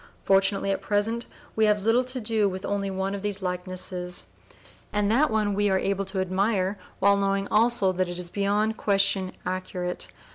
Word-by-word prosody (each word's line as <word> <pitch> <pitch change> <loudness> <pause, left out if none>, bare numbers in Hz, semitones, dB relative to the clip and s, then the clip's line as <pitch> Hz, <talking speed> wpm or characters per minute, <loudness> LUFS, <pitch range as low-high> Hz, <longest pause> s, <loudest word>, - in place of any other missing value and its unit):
Fortunately 195 0 +2
at 195 - -1
present 220 +3 0 0.3
we 220 - +3
have 210 -1 +2
to 250 +4 +2
do 215 -3 +2
with 190 +1 -6
only 200 -1 -1
one 190 +1 -2
of 200 - -4
these 205 -1 -3
likenesses, 180 0 -3 0.6
and 210 0 +1
that 280 +7 +4
one 215 -2 +1
we 205 +1 +2
are 190 - +3
able 195 +1 -1
to 195 0 -4
admire 190 +1 0 0.2
while 200 +1 +4
knowing 195 0 0
also 220 -3 +3
that 185 -1 -1
it 175 - -5
is 175 -1 -4
beyond 210 +2 0
question 195 -2 +1
accurate. 180 -1 -3
200 Hz, 175 wpm, -26 LUFS, 185-210 Hz, 0.6 s, that